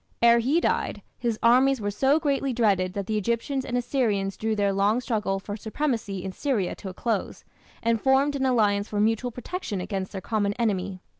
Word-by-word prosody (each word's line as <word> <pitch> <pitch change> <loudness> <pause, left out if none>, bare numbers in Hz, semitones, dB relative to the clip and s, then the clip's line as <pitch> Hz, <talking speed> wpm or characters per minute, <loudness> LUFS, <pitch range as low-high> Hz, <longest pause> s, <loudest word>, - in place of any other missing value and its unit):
Ere 235 0 +7
he 270 +8 +2
died - - -1 0.2
his 235 -3 -1
armies 255 +3 +5
were 205 -1 -2
so 270 +8 +3
greatly 275 -3 0
dreaded 195 -6 +2
that 200 -1 -3
the 215 +1 0
Egyptians 235 +6 -1
and 245 -1 -2
Assyrians 225 -6 0
drew 220 0 -1
their 200 -1 +1
long 200 +4 +2
struggle 215 -6 -1
for 205 +1 -6
supremacy 220 -4 -2
in 190 - -4
Syria 220 -5 -1
to 195 - -7
a - - -8
close, 225 -2 -2 0.4
and 230 -1 +1
formed 275 +2 +3
an 265 -1 +1
alliance 210 -5 +2
for 205 - -3
mutual 225 +3 +1
protection 245 - -5
against 190 0 -4
their 195 - -5
common 205 0 -1
enemy. 195 -4 -2
220 Hz, 195 wpm, -26 LUFS, 200-255 Hz, 0.4 s, Ere